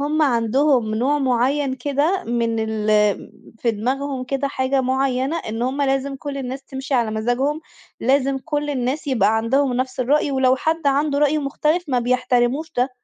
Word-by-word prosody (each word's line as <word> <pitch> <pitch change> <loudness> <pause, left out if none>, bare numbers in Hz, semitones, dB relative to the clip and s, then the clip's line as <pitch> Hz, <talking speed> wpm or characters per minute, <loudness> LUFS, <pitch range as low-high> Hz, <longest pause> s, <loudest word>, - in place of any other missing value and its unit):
هُم 305 +2 +1
عندهم 245 -2 +2
نوع 275 +6 +1
معين 260 +1 +1
كده 290 +8 0
من 230 -1 -1
ال 220 -1 -2 0.7
في 235 - +1
دماغهم 260 +4 -2
كده 275 +2 -2
حاجة 265 0 0
معينة، 265 +3 0
إن 225 -4 -4
هُم 270 +3 -1
لازم 270 0 0
كُلّ 285 0 -6
الناس 265 +1 -5
تمشِي 270 0 -5
على 235 -3 +2
مزاجهم، 245 +8 -1 0.4
لازم 270 +1 +2
كُلّ 295 +1 -3
الناس 265 +3 -2
يبقى 225 -5 +2
عندهم 260 +4 +1
نَفْس 255 +1 -2
الرأي، 285 +3 +2
ولو 265 -1 +3
حد 320 +2 -1
عنده 285 +1 +2
رأي 295 +1 +3
مختلف 300 +4 0
ما 255 -3 +1
بيحترموش 250 +5 0
ده، 250 +1 +2
265 Hz, 160 wpm, -21 LUFS, 245-285 Hz, 0.7 s, ولو